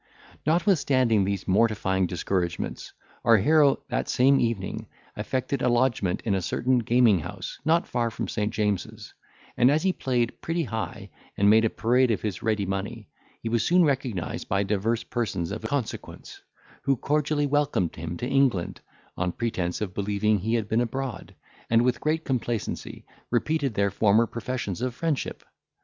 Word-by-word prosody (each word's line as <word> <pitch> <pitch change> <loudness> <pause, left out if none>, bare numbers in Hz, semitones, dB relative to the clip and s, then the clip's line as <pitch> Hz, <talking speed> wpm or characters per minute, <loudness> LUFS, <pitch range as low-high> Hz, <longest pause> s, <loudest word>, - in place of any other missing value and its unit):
Notwithstanding 140 - +3
these 100 -1 -3
mortifying 95 -2 +2
discouragements, 90 0 -3 0.3
our 115 -1 +6
hero, 145 +6 +4
that - - -2
same 135 +2 +4
evening, 115 -5 -2 0.3
effected 130 +1 -2
a - - +2
lodgment 120 -7 +1
in 105 - -1
a 95 - 0
certain 125 +7 +1
gaming 115 -4 +4
house 75 - -7
not 165 +2 +2
far 120 -1 0
from 115 - -4
St. 105 -1 -2
James's; 105 -4 -2 0.4
and, 125 +1 +5
as 150 +3 +2
he 190 -1 +2
played 120 -6 -1
pretty 165 +1 -1
high, 115 -5 -5 0.3
and 100 +1 +5
made 110 +1 +5
a - - +3
parade 125 +4 +2
of 110 - -1
his 105 -5 -3
ready 110 -3 0
money, 100 +3 -4 0.3
he 115 - -2
was 115 -1 +1
soon 180 +5 +4
recognised 125 - -2
by 100 +1 +2
divers 110 +3 0
persons 100 -9 -2
of 110 - -4
consequence, 140 -6 -5 0.4
who 135 - +2
cordially 150 +2 0
welcomed 145 - 0
him 85 +1 -5
to 120 - -3
England, 135 -10 +1 0.3
on 90 0 -1
pretence 95 -6 -2
of 100 -3 -3
believing 105 +1 +1
he 110 +5 0
had 110 -3 -1
been 110 +2 +1
abroad, 125 -1 -4 0.3
and 115 +1 +4
with 120 -1 +1
great 160 +1 0
complacency 120 -4 -3 0.2
repeated 135 0 0
their 100 0 +1
former 105 +3 +4
professions 115 -4 -4
of 125 -1 -2
friendship. 160 -4 -2
115 Hz, 160 wpm, -26 LUFS, 100-130 Hz, 0.4 s, our